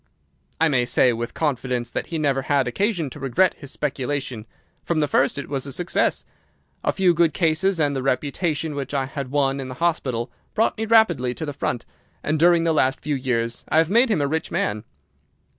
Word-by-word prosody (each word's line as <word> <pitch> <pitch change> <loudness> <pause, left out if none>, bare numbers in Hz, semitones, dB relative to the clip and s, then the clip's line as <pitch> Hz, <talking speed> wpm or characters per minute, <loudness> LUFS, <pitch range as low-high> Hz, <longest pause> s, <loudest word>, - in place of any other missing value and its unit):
"I 165 - +4
may 130 -5 +2
say 125 0 +3
with 115 +1 -5
confidence 125 -5 -1
that - - -3
he 165 - -3
never 140 -3 +1
had 135 -1 +1
occasion 170 - -1
to 145 - -9
regret 135 +7 +2
his 140 - -9
speculation. 135 -5 -3 0.4
From 170 -2 0
the 150 - +2
first 140 0 +2
it 140 - -5
was 140 -1 -3
a - - -5
success. 175 +6 0 0.6
A - - +2
few 185 -2 +3
good 170 -1 +2
cases 170 +2 +1
and 145 -2 +1
the 135 - -1
reputation 150 +4 -1
which 140 0 -4
I 135 -1 +1
had 135 -1 -5
won 135 -1 +1
in 135 - -5
the 130 - -7
hospital 135 -8 -1 0.2
brought 220 - +2
me 220 0 -3
rapidly 170 - +3
to 160 - -4
the 145 - -4
front, 120 -3 -3 0.4
and 155 0 0
during 170 0 +5
the 165 -1 +2
last 135 -3 +2
few 150 - -2
years 120 -3 -1
I - - +2
have 160 +2 +3
made 235 +4 +5
him 205 -9 +2
a - - +1
rich 160 +3 -2
man. 105 +2 -2
145 Hz, 210 wpm, -23 LUFS, 130-165 Hz, 0.6 s, during